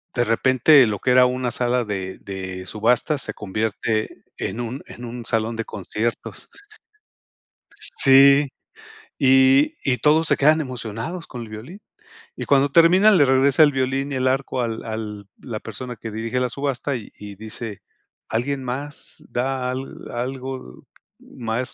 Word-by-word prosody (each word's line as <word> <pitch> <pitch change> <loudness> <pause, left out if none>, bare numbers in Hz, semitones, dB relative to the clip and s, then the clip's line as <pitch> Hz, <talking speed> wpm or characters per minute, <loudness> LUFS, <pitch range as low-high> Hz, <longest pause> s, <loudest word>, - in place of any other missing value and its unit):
de 120 - +2
repente, 130 +4 +5
lo 105 -2 -2
que 130 - -1
era 125 0 +6
una 125 0 -2
sala 125 0 0
de 95 -3 -5
de 95 -1 -7
subasta, 120 +7 +1
se - - -4
convierte 110 +2 -3
en 120 - -4
un 120 +3 -5
en 120 - -9
un 120 0 -7
salón 115 +1 -1
de 115 - -3
conciertos. 105 +4 -4 1.5
Sí, 140 +1 +6 0.7
y 135 +2 +5
y 125 -2 +1
todos, 155 +2 +3
se - - +3
quedan 155 +3 +4
emocionados 130 - -5
con 120 -3 -7
el 110 - -9
violín. 125 - -9 0.6
Y - - -5
cuando 140 0 +3
termina, 175 +7 +6
le 165 -7 +5
regresa 135 +3 +4
el 145 - +3
violín 135 +1 -1
y - - -2
el 130 0 0
arco, 130 -1 -1
al 115 -1 -4
al 105 -3 -6
la 110 -4 -6
persona 120 +3 -7
que 115 +1 -7
dirige 115 +3 -2
la 125 - 0
subasta, 140 0 -2
y 115 - -9
y 105 -1 -9
dice: 110 0 -7 0.5
"¿Alguien 135 +4 -2
más, 140 +4 -7
da 125 0 -2
al 130 +1 -7
algo 130 - -6 0.4
más, 115 -1 -4
125 Hz, 155 wpm, -22 LUFS, 110-135 Hz, 1.5 s, era